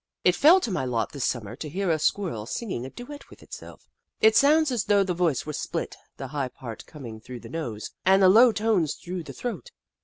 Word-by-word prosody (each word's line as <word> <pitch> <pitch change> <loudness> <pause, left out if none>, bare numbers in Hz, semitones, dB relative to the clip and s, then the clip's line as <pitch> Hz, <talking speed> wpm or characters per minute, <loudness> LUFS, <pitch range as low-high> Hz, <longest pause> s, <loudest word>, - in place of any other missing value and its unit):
It 180 - +5
fell 310 - +6
to 235 - -2
my 175 -7 -1
lot 120 -3 -1
this 140 -3 -3
Summer 115 -3 -3
to 150 - -6
hear 185 +3 -1
a 160 - +1
Squirrel 150 - -1
singing 185 - -4
a - - -8
duet 285 - -10
with - - -16
itself. - - -12 0.3
It 220 0 +5
sounds 300 +1 +4
as 235 -5 -1
though 200 -1 +4
the 185 -2 -2
voice 170 -6 0
were 150 - -5
split, - - -4 0.2
the 135 - -6
high 140 -1 -2
part 115 -4 -9
comingf 115 -7 -10
through 125 -2 -9
the - - -11
nose, 120 -10 -5
and 190 +1 +4
the - - +8
low 230 +6 +7
tones 210 -7 0
through 180 0 -6
the 160 - -9
throat. 245 - -5
175 Hz, 225 wpm, -26 LUFS, 130-220 Hz, 0.3 s, the